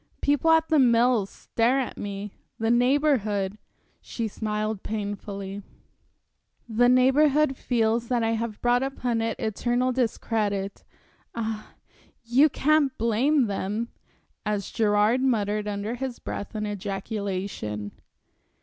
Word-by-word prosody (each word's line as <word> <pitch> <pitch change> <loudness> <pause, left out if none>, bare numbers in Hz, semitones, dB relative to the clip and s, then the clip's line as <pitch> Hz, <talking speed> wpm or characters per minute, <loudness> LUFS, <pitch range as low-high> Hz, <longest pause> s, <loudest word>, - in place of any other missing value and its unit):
People 290 +2 +2
at 320 0 +4
The 310 - +4
Mills 235 -4 +4
stare 240 +4 0
at 260 - -3
me, 200 0 -6 0.2
the 225 +1 +1
Neighborhood" 240 -6 +2 0.4
she 230 -2 -4
smiled 215 -1 -3
painfully 200 -2 -5 1.1
"the 240 +2 +3
Neighborhood 270 +3 +4
feels 230 -2 0
that 240 -2 +1
I 225 - +1
have 225 -1 -3
brought 245 +1 +3
upon 250 -4 -1
it 225 0 -2
eternal 240 +3 0
discredit. 215 -5 -1 0.5
Ah, 220 -2 -4 0.5
you 255 +6 +4
can't 290 -1 +2
blame 245 +5 +2
them" 210 +3 -2 0.5
as 210 -2 -2
Gerard 215 +3 +2
muttered 210 -5 0
under 205 +2 -3
his 250 0 -4
breath 205 - -6
an 215 0 -2
ejaculation. 195 - -4
225 Hz, 115 wpm, -26 LUFS, 205-250 Hz, 1.1 s, at